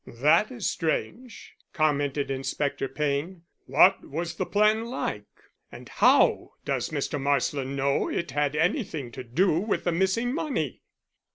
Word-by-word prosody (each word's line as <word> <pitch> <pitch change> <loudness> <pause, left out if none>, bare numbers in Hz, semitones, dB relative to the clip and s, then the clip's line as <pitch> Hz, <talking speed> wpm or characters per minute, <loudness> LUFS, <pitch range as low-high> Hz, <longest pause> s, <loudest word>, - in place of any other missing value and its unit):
"That 150 - +3
is 240 -6 -3
strange," 230 +9 -3 0.2
commented 145 -2 0
Inspector 135 +1 -2
Payne. 150 +6 -2 0.2
"What 195 +1 +5
was 165 +3 -4
the - - -3
plan 215 +2 +2
like? 105 - -4 0.4
And - - -11
how - - +3
does - - -1
Mr. 145 - -3
Marsland 140 0 0
know 140 0 0
it 170 -5 -3
had 145 +1 0
anything 160 - -1
to 130 - -7
do 160 +8 +1
with 210 +3 -1
the 175 - +1
missing 190 +8 0
money?" 265 - -3
155 Hz, 140 wpm, -26 LUFS, 140-190 Hz, 0.4 s, What